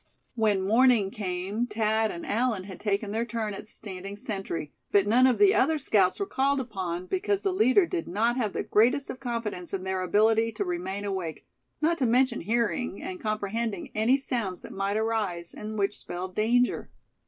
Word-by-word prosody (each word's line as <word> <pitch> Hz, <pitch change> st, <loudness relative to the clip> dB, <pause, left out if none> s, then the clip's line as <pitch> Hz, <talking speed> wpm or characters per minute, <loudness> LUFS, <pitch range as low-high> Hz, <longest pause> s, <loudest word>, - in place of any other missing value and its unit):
When 215 Hz, -5 st, +1 dB
morning 225 Hz, -2 st, +4 dB
came 200 Hz, +3 st, -2 dB
Thad 220 Hz, -1 st, +1 dB
and 170 Hz, -, -6 dB
Allan 225 Hz, -3 st, 0 dB
had 190 Hz, -1 st, -9 dB
taken 205 Hz, 0 st, -1 dB
their 225 Hz, +2 st, 0 dB
turn 225 Hz, -2 st, -3 dB
at 205 Hz, -, -8 dB
standing 195 Hz, -2 st, -7 dB
sentry; 195 Hz, -8 st, -4 dB, 0.2 s
but 200 Hz, -1 st, +4 dB
none 245 Hz, +5 st, +5 dB
of 255 Hz, -, +2 dB
the 400 Hz, -1 st, +6 dB
other 315 Hz, +4 st, +3 dB
scouts 205 Hz, -10 st, +2 dB
were 400 Hz, -, 0 dB
called 280 Hz, -4 st, +1 dB
upon, 185 Hz, -8 st, -4 dB
because 390 Hz, -, -1 dB
the 390 Hz, -, +1 dB
leader 255 Hz, -, +4 dB
did 340 Hz, 0 st, -3 dB
not 225 Hz, +6 st, +1 dB
have 220 Hz, -6 st, -1 dB
the -, -, -2 dB
greatest 250 Hz, +6 st, +2 dB
of 255 Hz, -, -9 dB
confidence 230 Hz, -8 st, -4 dB
in 185 Hz, -, -5 dB
their 190 Hz, 0 st, -2 dB
ability 220 Hz, +4 st, +3 dB
to 210 Hz, -2 st, -2 dB
remain 185 Hz, +3 st, -3 dB
awake, 185 Hz, -5 st, -4 dB, 0.4 s
not 335 Hz, +2 st, +2 dB
to 260 Hz, -, +2 dB
mention 250 Hz, +1 st, +2 dB
hearing, 235 Hz, -, -1 dB
and 365 Hz, +1 st, -6 dB
comprehending, 215 Hz, -1 st, -2 dB
any 225 Hz, +5 st, +3 dB
sounds 235 Hz, -9 st, -3 dB
that -, -, -9 dB
might 195 Hz, +1 st, -1 dB
arise, 210 Hz, -6 st, -1 dB
and 215 Hz, +1 st, -6 dB
which 200 Hz, 0 st, 0 dB
spelled 185 Hz, +1 st, -6 dB
danger. 240 Hz, +4 st, +1 dB
215 Hz, 185 wpm, -27 LUFS, 195-245 Hz, 0.4 s, the